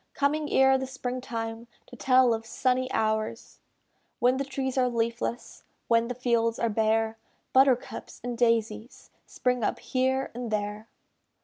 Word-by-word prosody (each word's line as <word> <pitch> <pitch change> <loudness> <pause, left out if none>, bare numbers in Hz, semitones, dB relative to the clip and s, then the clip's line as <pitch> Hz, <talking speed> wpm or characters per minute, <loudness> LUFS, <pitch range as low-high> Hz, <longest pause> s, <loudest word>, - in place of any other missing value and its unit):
Coming 295 +1 0
ere 265 0 +5
the 265 - -4
spring 255 -1 -4
time, 230 -1 -5 0.2
To - - -13
tell 255 -2 +4
of 225 0 -3
sunny 255 +2 0
hours. 220 0 -2 0.6
When 250 +2 +3
the 275 - -1
trees 265 -1 -3
are 255 -1 +2
leafless; 235 0 -3 0.2
When 230 0 +3
the 250 - -4
fields 230 -2 +1
are 230 - 0
bare; 220 +1 +1 0.3
Buttercups 260 -2 +2
and 245 0 -3
daisies 230 -1 -1 0.2
Spring 250 -2 -1
up - - 0
here 260 +1 -1
and 240 0 -5
there. 210 +1 -3
240 Hz, 145 wpm, -27 LUFS, 225-260 Hz, 0.6 s, ere